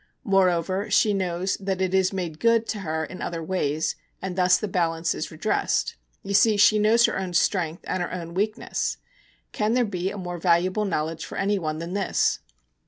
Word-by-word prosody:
Moreover, 190 -1 +1
she 210 +1 +3
knows 185 -1 -1
that 190 -1 -3
it 185 -1 0
is 190 -1 +3
made 175 -5 -4
good 230 -1 +3
to 210 - -2
her 160 -4 -2
in 185 - -9
other 165 -1 -4
ways, 160 -3 -1 0.2
and 190 -2 -5
thus 180 -1 +4
the 215 - -3
balance 165 -3 0
is - - -4
redressed. - - -1 0.3
You 200 - -4
see, 210 +1 +5
she 215 +1 +5
knows 225 +3 +5
her - - -1
own 185 -2 -4
strength 170 -2 +1
and 185 - -1
her 175 - -3
own 170 -2 -6
weakness. 210 +4 -2 0.5
Can 215 +2 0
there 250 -1 +3
be 185 -3 -2
a 205 - -7
more 175 -2 -5
valuable 185 +5 +2
knowledge 160 -3 -2
for - - -7
anyone 195 -6 -1
than 170 +2 -5
this? 200 -2 +1
185 Hz, 190 wpm, -25 LUFS, 170-200 Hz, 0.5 s, see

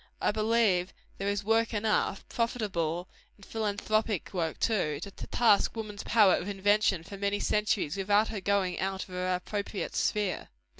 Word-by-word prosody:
I - - +2
believe 215 -4 +2 0.3
there 195 - -2
is 200 0 -1
work 225 +2 +2
enough 210 -2 0
profitable 185 -8 -1 0.3
and 200 - -15
philanthropic 215 -2 -1
work, 165 -3 -2
too 155 -10 0
to 200 - -7
task 225 +1 +2
woman's 215 -2 -5
powers 210 -5 +4
of 185 - -5
invention 200 -2 +2
for 200 +3 -9
many 200 +1 0
centuries, 205 -6 0
without 205 +2 +2
her 215 -3 -4
going 195 -2 0
out 190 0 -2
of - - -15
her 180 0 -2
appropriate 200 +2 -4
sphere. 205 -4 0
200 Hz, 155 wpm, -29 LUFS, 190-215 Hz, 0.3 s, powers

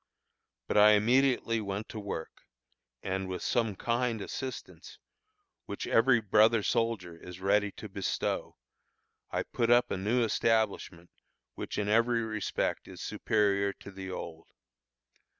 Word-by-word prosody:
But - - +2
I 105 +1 +8
immediately 115 +1 +2
went 100 +1 -4
to 110 - -6
work, 100 -6 -6 0.6
and 95 0 -2
with 90 -2 -5
some 115 -4 0
kind 120 +1 -1
assistance, 130 +5 -7 0.7
which 100 - -5
every 115 +1 +4
brother 110 +1 +4
soldier 105 -8 -1
is 90 +1 -11
so 95 - -14
ready 105 +1 +2
to 110 - -9
bestow, 95 -1 -3 0.7
I - - -1
put 115 -1 -1
up 120 +1 +4
a - - -1
new 110 +6 +1
establishment 110 -6 0 0.4
which - - -6
in 105 - -1
every 115 +2 +2
respect 110 -2 -2
is - - -11
superior 100 -2 0
to 100 - -12
the 95 -1 -8
old. 85 -3 -7
105 Hz, 135 wpm, -30 LUFS, 95-115 Hz, 0.7 s, I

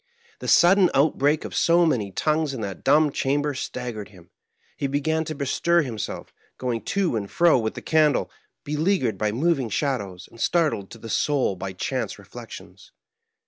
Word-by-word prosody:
The - - -7
sudden 180 +1 +6
outbreak 145 +1 +2
of - - -7
so 170 +1 +4
many 110 -11 0
tongues 155 +6 0
in 115 - -5
that 100 -2 -6
dumb 150 +2 +4
chamber 145 +2 0
staggered 120 -5 -5
him. 90 -4 -18 0.4
He 140 - -2
began 160 +3 0
to 155 - -5
bestir 165 +5 +1
him 120 -6 -6
self, - - -6 0.2
going 120 -3 -2
to 195 -9 0
and 100 -3 -3
fro 170 -6 +4
with 110 -1 -3
the - - -8
candle, 155 -2 +2 0.3
beleaguered 150 - 0
by 105 -1 0
moving 135 0 0
shadows, 100 -8 -3
and 115 - -13
startled 155 - +1
to - - -11
the 115 - -10
soul 135 -2 +1
by 95 +1 -6
chance 90 - -3
re - - -15
flections. - - -11
140 Hz, 175 wpm, -24 LUFS, 110-155 Hz, 0.4 s, sudden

